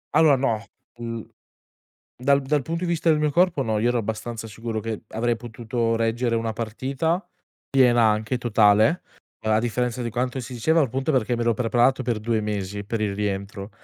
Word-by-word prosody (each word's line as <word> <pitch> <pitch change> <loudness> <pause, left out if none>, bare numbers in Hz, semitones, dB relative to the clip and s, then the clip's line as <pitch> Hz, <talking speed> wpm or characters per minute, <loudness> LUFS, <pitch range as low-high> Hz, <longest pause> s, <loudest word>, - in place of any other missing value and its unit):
Allora, 155 -2 +6
no. 115 -5 0 0.4
Mhmm, 115 -1 -5 0.9
dal 140 +2 +3
dal 145 +1 0
punto 165 +5 -3
di - - -1
vista 170 0 +2
del 155 - +3
mio 150 0 +1
corpo 170 -2 +2
no. 110 -3 0
Io 115 +3 +2
ero 120 0 +1
abbastanza 115 +1 -4
sicuro 115 +1 -4
che 110 0 -4
avrei 120 +1 0
potuto 115 0 -2
reggere 115 +1 0
una 115 -1 -1
partita 135 - -2 0.4
piena 125 -3 +4
anche, 110 +3 +1
totale. 110 - +4 0.4
A 110 0 +3
differenza 120 +1 -1
di 120 - -2
quanto 125 +3 -2
si 125 +1 -7
diceva, 160 +8 +2
al 140 - +2
punto 135 +6 -1
perché 125 -2 +1
mi 120 - -1
ero 115 0 +3
preparato 120 +3 +2
per 120 -3 -1
2 110 0 0
mesi 100 -1 -3
per 110 +2 -3
il 100 -2 -1
rientro. 100 0 -3
120 Hz, 185 wpm, -24 LUFS, 110-130 Hz, 0.9 s, Allora